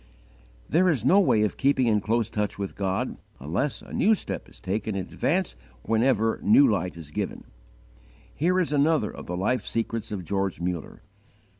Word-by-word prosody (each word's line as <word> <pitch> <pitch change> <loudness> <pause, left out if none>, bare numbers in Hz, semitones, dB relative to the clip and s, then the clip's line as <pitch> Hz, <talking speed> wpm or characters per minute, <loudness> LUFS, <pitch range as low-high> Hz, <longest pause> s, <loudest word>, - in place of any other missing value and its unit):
There 180 +3 +3
is 130 -9 0
no 185 +9 +6
way 115 - +3
of 105 - -1
keeping 135 -2 +2
in 105 -3 +2
close 110 +2 0
touch 105 -2 -2
with 100 -1 -5
God 95 -1 -2 0.2
unless 85 - -2
a - - -12
new 220 +2 +4
step - - -5
is - - -17
taken 105 +2 -3
in 95 -2 -2
advance - - -1 0.3
whenever 115 -1 +2
new 270 +6 +6
light 90 - -1
is 80 -3 -10
given. - - -4 0.9
Here 180 +4 +1
is 165 -5 0
another 145 -5 +2
of - - -10
the 90 - -3
life 105 +4 0
secrets 115 0 -3
of 95 -4 -4
George 95 0 -1
Muller. 90 +4 -4
110 Hz, 175 wpm, -26 LUFS, 95-140 Hz, 0.9 s, no